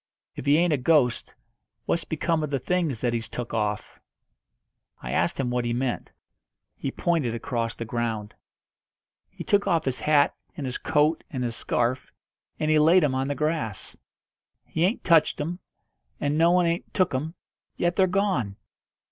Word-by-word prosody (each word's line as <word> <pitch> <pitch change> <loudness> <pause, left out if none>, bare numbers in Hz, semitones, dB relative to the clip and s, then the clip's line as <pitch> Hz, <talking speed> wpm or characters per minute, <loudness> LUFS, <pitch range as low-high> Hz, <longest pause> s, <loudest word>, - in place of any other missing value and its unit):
"If - - -7
he 145 +2 +6
ain't 170 -1 +3
a - - +2
ghost, 125 -2 +2 0.5
what's 170 -2 0
become 160 +1 0
of 150 - -2
the 140 - 0
things 160 -4 -1
that 120 -1 0
he's 115 -1 -3
took 120 -1 -6
off?" 105 -2 -2 1.0
I - - -6
asked - - 0
him 125 -3 0
what 125 0 0
he 120 0 -1
meant. 125 0 -2 0.6
He 135 - -3
pointed 145 -6 0
across 115 -1 -2
the 115 - -5
ground. 110 -2 -3 1.0
"He - - -8
took 205 0 +2
off 165 -2 +2
his 130 -1 -1
hat 150 -2 +3 0.2
and 145 - -4
his 130 -1 -4
coat 155 0 +2
and 130 -3 -3
his 120 -2 -3
scarf, 120 +2 -1 0.5
and 155 0 +1
he 155 - +5
laid 165 +4 +5
'em 145 -3 +2
on 130 +1 -1
the 145 - -2
grass. 150 - -2 0.7
He 160 +2 0
ain't 200 +6 -1
touched 165 -3 +4
'em, 170 +5 -3 0.6
and 145 +1 0
no 165 +2 +4
one 180 0 +4
ain't 170 +1 -1
took 185 -6 +2
'em, 155 +6 -3 0.4
yet 175 0 +1
they're 190 -1 +4
gone! 185 - 0
145 Hz, 175 wpm, -26 LUFS, 120-165 Hz, 1.0 s, he